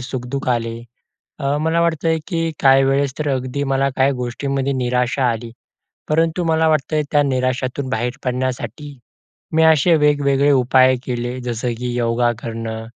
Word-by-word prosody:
सुख-दुःख 130 +1 -5
आले. 115 -1 -3 0.6
अ, 140 +1 0
मला 165 +1 +1
वाटतंय, 165 -1 +1
की 170 -4 -1 0.2
काही 135 0 +6
वेळेस 135 0 +1
तर 150 -1 -1
अगदी 130 +2 -3
मला 135 +1 +2
काही 135 +1 +3
गोष्टींमध्ये 135 +2 -2
निराशा 125 0 0
आली. 115 0 -5 0.6
परंतु 165 +3 +1
मला 160 0 +2
वाटतं, 155 0 +1
त्या 145 - +4
निराशातून 130 0 -1
बाहेर 120 +2 -1
पडण्यासाठी, 130 +3 -4 0.6
मी 160 - +4
असे 160 +1 +5
वेगवेगळे 145 -2 +2
उपाय 130 0 +4
केले, 120 0 -3
जसं 120 0 -3
की 125 0 -3
योगा 120 0 +1
करणं, 115 -1 -5
135 Hz, 145 wpm, -19 LUFS, 125-145 Hz, 0.6 s, काही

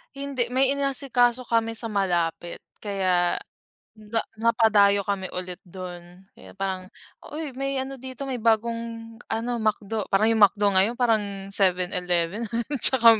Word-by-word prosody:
Hindi 275 -3 -2
may 265 +1 +3
inasikaso 255 -3 +1
kami 230 -1 +1
sa 225 +1 -3
malapit, 175 -5 -1 0.2
kaya, 185 -4 +1 0.6
ga 215 +1 -2 0.2
napadayo 220 -3 +4
kami 195 -2 -1
ulit 180 -1 -5
dun, 180 0 -10
kaya - - -14
parang, 190 -1 -3 0.4
uy 305 -1 -5
may 275 +1 -2
ano 265 +1 -4
dito, 260 +2 -7
may 260 - -2
bagong 230 0 -1 0.2
ano 230 +2 -1
McDo. 215 -1 -1
Parang 205 +3 +4
yung 225 -1 +1
McDo 205 +1 +4
ngayon 195 +5 +3
parang 205 -5 0
7/11 180 +1 0 0.3
tsaka 230 -4 +7
220 Hz, 130 wpm, -25 LUFS, 190-235 Hz, 0.6 s, tsaka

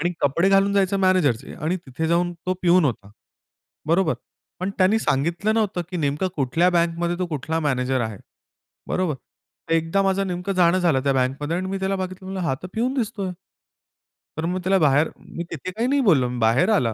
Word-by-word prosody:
आणि 175 +3 0
कपडे 170 +7 +2
घालून 195 0 +4
जायचं 195 0 +2
मॅनेजरचे 185 -11 +1
आणि 160 +5 -2
तिथे 160 -2 -5
जाऊन 175 +1 +1
तो 185 - +1
पिऊन 180 -1 +5
होता. 110 -7 -2 0.8
बरोबर. 165 0 +3 0.5
पण 185 +2 -1
त्यानी 190 +4 +4
सांगितलं 170 +6 0
नव्हतं 210 -5 0
की 185 - -3
नेमकं 150 +3 0
कुठल्या 160 +6 +2
बँकमध्ये 170 0 0
तो 180 - -1
कुठला 160 0 -2
मॅनेजर 130 -3 0
आहे. 110 -4 -3 0.7
बरोबर. 185 -5 0 0.6
एकदा 165 +4 +1
माझं 195 0 +1
नेमकं 180 +2 -3
जाणं 180 0 +4
झालं 170 -7 +2
त्या 140 - +3
बँकमध्ये 135 +5 -1
आणि 185 +1 -2
मी 195 - -2
त्याला 190 +1 0
बघितलं. 185 0 -6
म्हणलं, 190 0 -4
"हा 135 - +1
तर - - -5
पिऊन 245 +4 0
दिसतोय". 205 -7 -2 1.1
तर 160 - -2
मग 180 +2 -1
त्याला 190 +2 +3
बाहेर 150 0 +3
मी 170 - -7
तिथे 165 +4 -5
काही 225 +6 -1
नाही 280 +1 +2
बोललो. 155 - +4
मी 125 - -4
बाहेर 115 - +3
आला. 125 - +2
175 Hz, 190 wpm, -23 LUFS, 145-190 Hz, 1.1 s, पिऊन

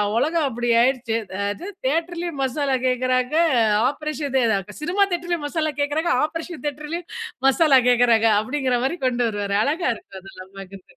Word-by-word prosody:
உ - - -2
உலகம் 315 +2 +1
அப்படி 240 0 -2
ஆயிடுச்சு. 245 -3 0 0.3
அது 270 - -7 0.2
தியேட்டர்லயும் 335 0 -2
மசாலா 270 0 0
கேட்கறாங்க, 255 +2 0 0.6
ஆப்ரேஷன் 300 -1 -5
இது 220 -6 0
சினிமா 380 +5 +2
தியேட்டர்லயும் 345 -3 -2
மசாலா 310 -1 -1
கேட்குறாங்க. 315 +4 0
ஆப்ரேஷன் 330 +1 -7
தியேட்டர்லயும் 300 +4 -5 0.4
மசாலா 275 -2 +5
கேட்குறாங்க," 235 -2 +4
அப்படிங்கிற 255 +1 -1
மாரி 340 +6 -1
கொண்டு 245 -1 0
வருவாரு. 205 -1 -2
அழகா 310 +2 0
இருக்கும் 190 -2 -12
அதெல்லாம் 190 0 -13
பார்க்கறதுக்கு. 195 -1 -12
270 Hz, 140 wpm, -22 LUFS, 240-320 Hz, 0.6 s, மசாலா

